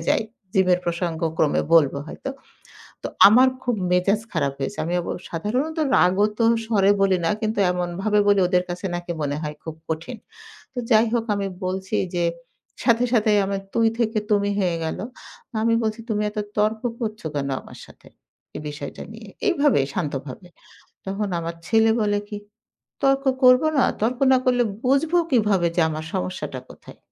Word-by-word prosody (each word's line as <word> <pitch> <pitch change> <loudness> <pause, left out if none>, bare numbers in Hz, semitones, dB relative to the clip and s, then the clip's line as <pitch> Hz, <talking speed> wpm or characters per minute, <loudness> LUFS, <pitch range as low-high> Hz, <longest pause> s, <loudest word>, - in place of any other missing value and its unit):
যায়। 225 - +2 0.3
জিম 190 -1 +4
এর 180 - -3
প্রসঙ্গ 170 -1 -2 0.2
ক্রমে 150 - +2
বলবো 140 -4 +4
হয়তো। 270 - -6 0.7
তো - - -3 0.2
আমার 250 +5 +6
খুব 245 -2 0 0.2
মেজাজ 195 +4 +2
খারাপ 140 -5 0
হয়েছে। 135 - -4
আমি 170 +2 -2
অব 170 - -8 0.2
সাধারণত 250 - -2 0.2
রাগত্ব 205 +4 +2 0.3
স্বরে 200 -3 +3
বলি 190 -2 +3
না। - - +2
কিন্তু 220 -1 -2
এমনভাবে 180 +4 -1
বলি 200 -1 +4
ওদের 180 0 +2
কাছে 180 +2 -4
নাকি 175 0 -5
মনে 145 0 -1
হয় 150 -1 -4
খুব 160 -1 -6
কঠিন। 160 +9 -4 0.6
তো - - -5
যাই 225 0 +5
হোক 230 -1 0
আমি 200 - -2 0.2
বলছি 190 +1 -3 0.2
যে, 175 - +1 0.6
সাথে, 235 -1 +3
সাথে 215 -2 +3 0.2
আমার 195 0 -2
তুই 230 -1 +4
থেকে 225 -2 0
তুমি 205 -1 +2
হয়ে 180 -3 0
গেল। 160 - -3 0.6
আমি 230 0 +3
বলছি, 220 +1 -2
"তুমি 210 -1 0
এত 210 - -7 0.2
তর্ক 215 +1 +1 0.2
করছ 215 -2 -4
কেন 140 -1 -2
আমার - - -13
সাথে? - - -18 0.5
এই - - -5
বিষয়টা 145 0 -7
নিয়ে?" - - -11 0.2
এইভাবে, 290 - +3
শান্তভাবে। 150 0 -5 0.6
তখন 200 +2 -2
আমার 165 0 -5
ছেলে 225 0 +4
বলে 205 -1 +1
কি? 210 - -6 0.7
"তর্ক 275 0 +2 0.2
করব 250 +2 +7 0.2
না? 260 - +5 0.2
তর্ক 240 +3 0
না 260 - +6
করলে 245 -1 +3 0.2
বুঝব 275 +6 +2 0.2
কিভাবে 210 -7 +3
যে 175 - +3
আমার 155 0 -5
সমস্যাটা 90 0 -4
কোথায়?" - - -14
205 Hz, 165 wpm, -23 LUFS, 175-225 Hz, 0.7 s, করব